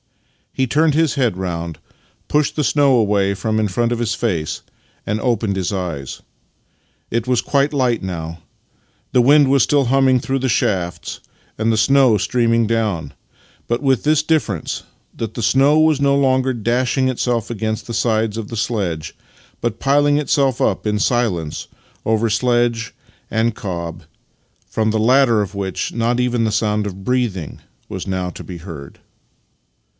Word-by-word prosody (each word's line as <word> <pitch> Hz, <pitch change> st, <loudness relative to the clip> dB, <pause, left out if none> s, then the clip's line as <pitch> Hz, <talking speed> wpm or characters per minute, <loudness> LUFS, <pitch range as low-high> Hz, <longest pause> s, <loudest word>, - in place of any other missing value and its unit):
He 130 Hz, -, 0 dB
turned 150 Hz, +3 st, +2 dB
his 160 Hz, -2 st, +2 dB
head 125 Hz, -9 st, 0 dB
round, 85 Hz, -3 st, -4 dB, 0.5 s
pushed 150 Hz, -1 st, +1 dB
the 150 Hz, -, 0 dB
snow 140 Hz, -2 st, +3 dB
away 100 Hz, -3 st, +2 dB
from 110 Hz, +3 st, -1 dB
in 110 Hz, -, +1 dB
front 120 Hz, +5 st, 0 dB
of 120 Hz, -, -1 dB
his 115 Hz, -2 st, -1 dB
face, 90 Hz, -10 st, -2 dB, 0.4 s
and 105 Hz, +1 st, -2 dB
opened 110 Hz, -5 st, 0 dB
his 95 Hz, 0 st, -2 dB
eyes. 85 Hz, -9 st, -4 dB, 0.9 s
It 115 Hz, 0 st, 0 dB
was 125 Hz, -2 st, +2 dB
quite 140 Hz, +3 st, +1 dB
light 125 Hz, -7 st, 0 dB
now. 85 Hz, -3 st, -5 dB, 0.7 s
The 125 Hz, -, +5 dB
wind 140 Hz, +2 st, +5 dB
was 135 Hz, -3 st, +4 dB
still 145 Hz, -2 st, +2 dB
humming 130 Hz, 0 st, +3 dB
through 135 Hz, +2 st, -2 dB
the 130 Hz, 0 st, -1 dB
shafts 90 Hz, -6 st, -1 dB, 0.4 s
and 110 Hz, +1 st, +1 dB
the 110 Hz, -, +1 dB
snow 130 Hz, 0 st, +4 dB
streaming 115 Hz, +1 st, +1 dB
down 105 Hz, -10 st, -1 dB, 0.3 s
— -, -, -32 dB
but 120 Hz, +2 st, 0 dB
with 135 Hz, -3 st, +2 dB
this 155 Hz, 0 st, +3 dB
difference, 145 Hz, -, -1 dB, 0.3 s
that 115 Hz, -2 st, -5 dB
the 120 Hz, -, -3 dB
snow 135 Hz, +7 st, +4 dB
was 155 Hz, -2 st, +3 dB
no 140 Hz, 0 st, +3 dB
longer 130 Hz, -1 st, +2 dB
dashing 125 Hz, +3 st, 0 dB
itself 120 Hz, -3 st, -1 dB
against 110 Hz, -1 st, -3 dB
the 115 Hz, -, -5 dB
sides 110 Hz, -2 st, 0 dB
of 110 Hz, -2 st, -5 dB
the 115 Hz, -, -5 dB
sledge, 90 Hz, -9 st, -2 dB, 0.5 s
but 115 Hz, -2 st, -2 dB
piling 145 Hz, +1 st, +3 dB
itself 140 Hz, -3 st, +1 dB
up -, -, 0 dB
in 105 Hz, -1 st, 0 dB
silence 105 Hz, -10 st, -1 dB, 0.4 s
over 110 Hz, +1 st, +1 dB
sledge 120 Hz, 0 st, +1 dB, 0.4 s
and 110 Hz, 0 st, 0 dB
cob 85 Hz, -4 st, -5 dB, 0.3 s
— -, -, -42 dB
from 110 Hz, -1 st, 0 dB
the 110 Hz, -, 0 dB
latter 120 Hz, -1 st, +4 dB
of 100 Hz, 0 st, -4 dB
which 95 Hz, -2 st, -3 dB
not 120 Hz, +1 st, 0 dB
even 125 Hz, -2 st, +1 dB
the 110 Hz, -, +1 dB
sound 105 Hz, 0 st, 0 dB
of 95 Hz, -1 st, -8 dB
breath 125 Hz, -6 st, 0 dB
ing 80 Hz, -5 st, -8 dB, 0.3 s
was -, -, -6 dB
now 95 Hz, -1 st, -2 dB
to -, -, -10 dB
be 90 Hz, -, -8 dB
heard. 80 Hz, -5 st, -10 dB
115 Hz, 170 wpm, -19 LUFS, 100-130 Hz, 0.9 s, The